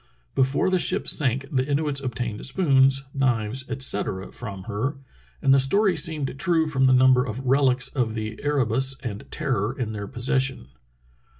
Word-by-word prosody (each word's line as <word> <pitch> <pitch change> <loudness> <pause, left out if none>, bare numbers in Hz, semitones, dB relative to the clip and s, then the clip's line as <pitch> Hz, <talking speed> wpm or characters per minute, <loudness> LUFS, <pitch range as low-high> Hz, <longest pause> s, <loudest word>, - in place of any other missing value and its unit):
Before 135 +7 +1
the 185 - +2
ship - - 0
sank 135 -2 +1
the 130 -3 +1
Inuits 145 0 -1
obtained 120 -4 -4
spoons, 135 -3 +3
knives, 130 -2 -1
etc., 105 -7 -1
from 100 -5 -8
her, 115 +7 -3 0.5
and 135 - +5
the 135 - +5
story 190 +8 +2
seemed 150 -4 -1
true 170 -3 +2
from 135 -4 +1
the 130 - +5
number 130 0 +5
of 125 +2 -6
relics 130 -1 +3
of 120 -5 -2
the 110 0 -5
Ere 145 -3 +1
bus 130 +4 +1
and 110 -6 -6
Terror 110 +7 -2
in 120 -5 -3
their 100 -2 -6
possession. 130 - -1
130 Hz, 165 wpm, -24 LUFS, 120-140 Hz, 0.5 s, and